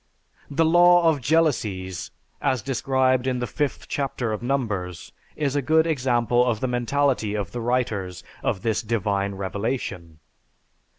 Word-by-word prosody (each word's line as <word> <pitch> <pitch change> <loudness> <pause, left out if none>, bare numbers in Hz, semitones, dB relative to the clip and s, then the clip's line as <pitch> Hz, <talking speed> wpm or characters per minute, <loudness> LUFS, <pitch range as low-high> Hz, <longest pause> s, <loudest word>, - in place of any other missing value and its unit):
The 160 +3 +2
"law 175 +1 +6
of 155 -4 +2
jealousies" 110 - 0 0.3
as 130 -5 0
described 130 0 +1
in 130 -1 0
the 125 - -2
5th 145 +2 -2
chapter 130 -5 -2
of 105 - -4
Numbers 105 -10 -3 0.2
is 145 -2 -1
a 145 - +2
good 160 +4 +3
example 125 -5 +2
of 120 -3 0
the 130 - -1
mentality 125 -2 0
of 100 -4 -3
the 120 - -4
writers 110 -7 -1 0.2
of 95 - -2
this 110 -2 0
"divine 100 -3 -1
revelation." 95 -4 -4
125 Hz, 140 wpm, -24 LUFS, 105-140 Hz, 0.3 s, law